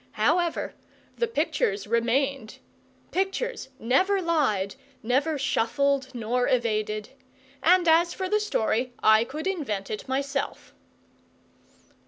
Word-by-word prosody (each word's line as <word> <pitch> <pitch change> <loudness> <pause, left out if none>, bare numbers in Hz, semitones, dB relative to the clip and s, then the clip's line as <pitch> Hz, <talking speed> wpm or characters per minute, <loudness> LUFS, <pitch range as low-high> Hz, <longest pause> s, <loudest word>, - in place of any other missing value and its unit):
However, 345 -2 +1 0.4
the 470 - 0
pictures 440 -2 0
remained; 240 +1 0 0.5
pictures 390 - -2
never 370 - +2
lied, 270 - +1 0.3
never 280 +7 +1
shuffled 275 +2 +1
nor 245 +2 0
evaded; 215 -3 0 0.5
and 355 +2 +4
as 335 +2 +5
for 375 - -3
the 425 +3 +2
story, 245 - 0
I 220 +1 +6
could 300 +7 -6
invent 270 - -2
it 215 - -5
myself. 275 +1 -3
275 Hz, 105 wpm, -26 LUFS, 230-345 Hz, 0.5 s, I